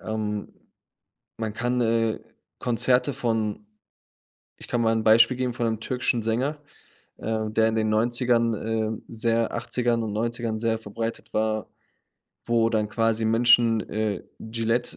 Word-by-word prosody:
Ähm, 105 -1 -4 0.9
man 110 -2 -3
kann, 125 +2 -1
äh, 115 -1 +1 0.4
Konzerte 125 +3 +2
von 110 -4 -2 0.9
ich - - -10
kann 120 - 0
mal 115 0 +3
'n 110 -1 -1
Beispiel 115 +3 +6
geben 125 -1 -1
von 120 -1 -1
'nem 110 -1 -2
türkischen 125 -1 0
Sänger, 125 +7 -1 0.6
ähm, 110 -1 -2
der 110 0 +4
in 110 - -1
den 110 -1 +1
90ern, 115 +1 +2
ähm, 110 0 -2
sehr 115 0 0
80ern 120 0 0
und 110 -2 -3
90ern 115 0 -2
sehr 115 -1 0
verbreitet 115 +1 -6
war, 110 0 0 0.8
wo 115 -1 +2
dann 110 -2 0
quasi 115 0 0
Menschen, 115 0 +5
äh, 105 -1 -2 0.2
Gilette 115 +2 -1
115 Hz, 140 wpm, -25 LUFS, 110-120 Hz, 0.9 s, Beispiel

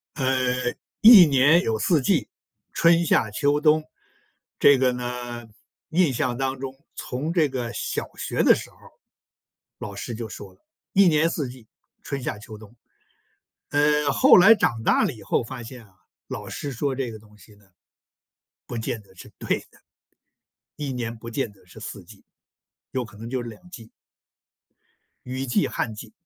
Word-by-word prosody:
呃， 135 - -2 0.8
一 220 -5 +10
年 145 +4 +4
有 110 -1 -1
四 165 - +2
季， 125 - +1 0.4
春、 170 0 +4
夏、 110 -9 +2
秋、 145 +7 +1
冬。 155 0 +3 0.8
这 145 -1 +6
个 130 -1 +2
呢， 120 -1 -6 0.4
印 165 -4 +2
象 120 0 -1
当 135 0 -2
中 135 0 -6 0.2
从 145 +6 -4
这 160 -5 +2
个 120 -3 -4
小 - - -3
学 - - -2
的 - - +7
时 - - -5
候， - - -24 1.0
老 100 - -7
师 115 +4 -6
就 115 0 -6
说 100 -2 -10
了， - - -29 0.3
一 195 -1 +5
年 160 0 +3
四 145 -7 -3
季， 125 -3 -14 0.4
春、 140 -1 -4
夏、 115 - -4
秋、 110 0 -11
冬。 110 +1 -15 0.9
呃， 150 0 +2
后 - - +6
来 195 +5 +8
长 120 - 0
大 - - +3
了 - - 0
以 110 - -13
后 - - 0
发 125 +1 -8
现 115 -1 -11
啊， 95 - -28 0.3
老 - - -7
师 145 - -5
说 135 +2 -2
这 130 -2 -3
个 110 - -9
东 105 0 -20
西 105 +2 -18
呢， 100 0 -24 1.0
不 120 - -5
见 110 0 -4
得 100 -2 -23
是 90 - -12
对 - - 0
的。 - - -24 1.0
一 145 -3 -4
年 120 -2 -4
不 115 +1 -9
见 115 -1 -3
得 100 - -24
是 - - -15
四 - - -8
季， - - -17 0.7
有 130 - -2
可 110 -2 -14
能 115 +2 -8
就 125 -1 -3
是 120 - -7
两 115 +11 -14
季。 115 -10 -12 1.4
雨 130 +2 -4
季、 120 - +1
旱 115 - -3
季。 105 - -11
125 Hz, 185 characters per minute, -24 LUFS, 115-145 Hz, 1.4 s, 一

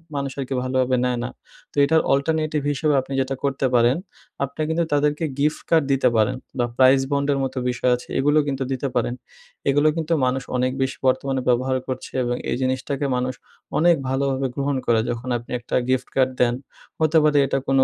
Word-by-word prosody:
মানুষ 140 -1 -2
আরকি 135 0 -3
ভালোভাবে 130 0 +1
নেয় 125 -1 0
না। 125 - -3 0.4
তো - - -23
এটার 160 +2 +3
অল্টারনেটিভ 155 +2 0
হিসেবে 150 +1 +1
আপনি 135 - -8
যেটা 135 +1 -2
করতে 140 -1 0
পারেন, 120 +3 +4 0.5
আপনি 140 +3 -4
কিন্তু 165 +1 +1
তাদেরকে 150 +2 +1
গিফট 150 +2 +1
কার্ড 165 -2 +4
দিতে 135 -2 +3
পারেন, 110 +3 +2 0.2
বা 120 - +2
প্রাইস 130 +1 +6
বন্ড 140 0 +1
এর - - -1
মতো 135 0 -4
বিষয় 125 0 +1
আছে, 125 - -10
এগুলো 145 +3 +3
কিন্তু 135 -1 -1
দিতে 135 +1 -1
পারেন। 120 0 +1 0.6
এগুলো 145 +2 +3
কিন্তু 165 0 -1
মানুষ 130 +1 0
অনেক 125 +1 +1
বেশ 130 0 0
বর্তমানে 130 +1 +1
ব্যবহার 130 +2 +2
করছে, 130 -1 -5
এবং 120 0 -1 0.2
এই - - +1
জিনিসটাকে 130 +2 -1
মানুষ 125 +1 -1 0.4
অনেক 170 +2 +5
ভালোভাবে 135 0 0
গ্রহণ 140 0 -1
করে, 115 -1 +3
যখন 120 +2 -4
আপনি 120 0 -12
একটা 120 - -4
গিফট 130 -1 +1
কার্ড 130 -1 +3
দেন, 120 -1 +4 0.5
হতে 160 0 +3
পারে 150 -1 +3
এটা 135 - 0
কোনো 135 -1 +4
135 Hz, 190 wpm, -22 LUFS, 130-145 Hz, 0.6 s, প্রাইস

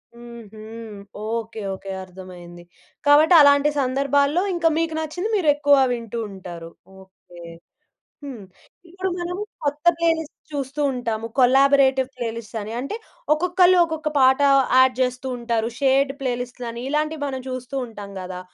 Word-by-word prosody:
హుహు. 235 -3 -12 0.7
Okay, 225 -1 -4
okay. 195 +1 -8
అర్థమయింది. 180 -2 -12 0.4
కాబట్టి 300 +4 +6
అలాంటి 285 0 +5
సందర్భాల్లో 280 +5 +1
ఇంకా 335 -1 +2
మీకు 330 -1 -1
నచ్చింది 350 +7 -4
మీరెక్కువ 290 -5 +3
వింటూ 235 -1 -4
ఉంటారు. 175 -3 -9 0.3
ఓకే. 190 -2 -18 0.8
హ్మ్. 260 -7 -8 0.5
ఇప్పుడు 375 +2 -4
మనం 350 +1 -4 0.3
కొత్త 295 +3 -3
ప్లేలిస్ట్ 325 -2 -1 0.2
చూస్తూ 280 0 -4
ఉంటాము. 230 -2 -3
కొలాబరేటివ్ 265 0 +4
ప్లేలిస్ట్ 230 -2 -6
అని 215 +2 -7
అంటే 275 - -4 0.4
ఒక్కొక్కళ్ళు 360 +3 +3
ఒక్కొక్క 315 -1 -3
పాట 260 0 +5 0.4
యాడ్ 260 -1 +5
చేస్తూ 255 +1 -1
ఉంటారు. 230 -1 -1
షేర్డ్ 275 0 +2
ప్లేలిస్ట్‌లని 245 -2 -4
ఇలాంటివి 305 +1 -1
మనం 265 -1 -5
చూస్తూ 255 +1 -6
ఉంటాం 205 -3 -10
కదా! 180 0 -7
260 Hz, 125 wpm, -22 LUFS, 230-295 Hz, 0.8 s, కాబట్టి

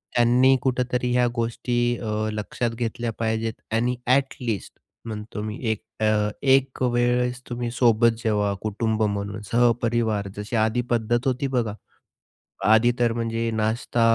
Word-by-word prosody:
त्यांनी 125 +2 +5
कुठेतरी 125 -1 0
ह्या 125 0 +3
गोष्टी 120 +1 -2 0.2
अ, 110 -1 -2
लक्षात 110 +3 -2
घेतल्या 115 0 -3
पाहिजेत. 110 0 -1 0.2
आणि 120 +2 +1
ॲट 135 +1 +3
लीस्ट 115 -5 -3 0.3
म्हणतो 105 -1 -6
मी 110 +1 -5
1 110 - -4 0.2
अ, 105 -1 +2
1 135 -1 +3
वेळेस 125 0 +1
तुम्ही 120 -1 -3
सोबत 115 -1 +4
जेवा, 105 -2 +1
कुटुंब 110 +1 -1
म्हणून 100 0 -2
सहपरिवार 115 -3 +2
जशी 105 +3 -4
आधी 120 +3 0
पद्धत 120 +2 +1
होती 130 +2 0
बघा. 120 -5 -1 0.9
आधी 110 +3 +5
तर 120 -1 +2
म्हणजे 115 0 -1
नाश्ता, 110 +2 -1
115 Hz, 135 wpm, -24 LUFS, 110-125 Hz, 0.9 s, त्यांनी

